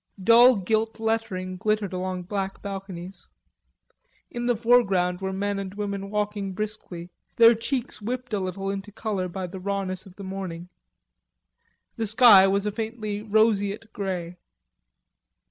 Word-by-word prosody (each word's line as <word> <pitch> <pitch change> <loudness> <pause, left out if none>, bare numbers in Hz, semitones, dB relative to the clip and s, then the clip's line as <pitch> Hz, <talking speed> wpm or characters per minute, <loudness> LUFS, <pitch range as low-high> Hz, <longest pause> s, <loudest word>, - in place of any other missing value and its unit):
Dull 240 +4 +7
gilt 220 +3 -1
lettering 195 -5 -2
glittered 210 0 -1
along 185 0 -3
black 195 +1 -4
balconies. 195 -2 -7 1.0
In 240 0 -3
the 245 - +3
foreground 195 -6 +2
were 190 0 -2
men 200 +1 -2
and 195 0 -6
women 200 -1 -4
walking 205 -2 -2
briskly, 185 -4 -6 0.2
their 230 0 +8
cheeks 240 +1 -3
whipped 250 +2 -4
a 205 - +1
little 195 +1 -3
into 200 +1 -6
color 205 -3 -3
by 185 +1 -5
the 185 +2 -8
rawness 195 -1 -3
of 185 - -15
the 200 - -9
morning. 185 -3 -6 1.3
The 225 -1 -1
sky 215 -3 +7
was 200 +1 +1
a 210 - 0
faintly 220 -1 -4
roseate 215 0 +1
grey. 180 -3 -4
200 Hz, 140 wpm, -25 LUFS, 190-220 Hz, 1.3 s, their